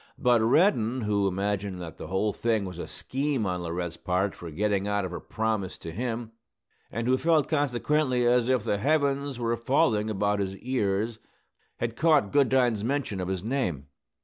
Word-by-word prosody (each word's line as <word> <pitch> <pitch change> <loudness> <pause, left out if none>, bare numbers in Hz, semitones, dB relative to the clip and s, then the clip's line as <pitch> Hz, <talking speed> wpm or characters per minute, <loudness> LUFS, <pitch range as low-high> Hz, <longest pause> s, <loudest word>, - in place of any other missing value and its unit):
But 120 -2 +3
Reddin, 125 - +3
who 105 -2 +1
imagined 100 0 -2
that 80 -2 -8
the - - -7
whole 100 +4 0
thing 110 -3 0
was 90 -2 -7
a - - -5
scheme 135 -3 -2
on 90 -1 -2
Laurette's 85 0 -4
part 95 +2 0
for 85 - -9
getting 100 +4 0
out 105 -1 0
of 90 - -5
her 90 - -5
promise 110 -4 -2
to 80 - -7
him, 115 +3 -3 0.6
and 115 +1 -3
who 130 +1 +3
felt, 160 -4 +3
consequently, 145 -2 +1
as 120 0 +3
if 130 -4 +2
the 105 -3 0
heavens 140 -1 +1
were 115 -1 0
falling 115 -3 +2
about 105 0 0
his 95 -1 -2
ears, 110 -2 -1 0.6
had 115 -1 -3
caught 150 -9 +3
Goodine's 125 -6 +3
mention 120 -6 -1
of 90 - -3
his 95 -1 -3
name. 95 - -2
110 Hz, 175 wpm, -27 LUFS, 100-130 Hz, 0.6 s, But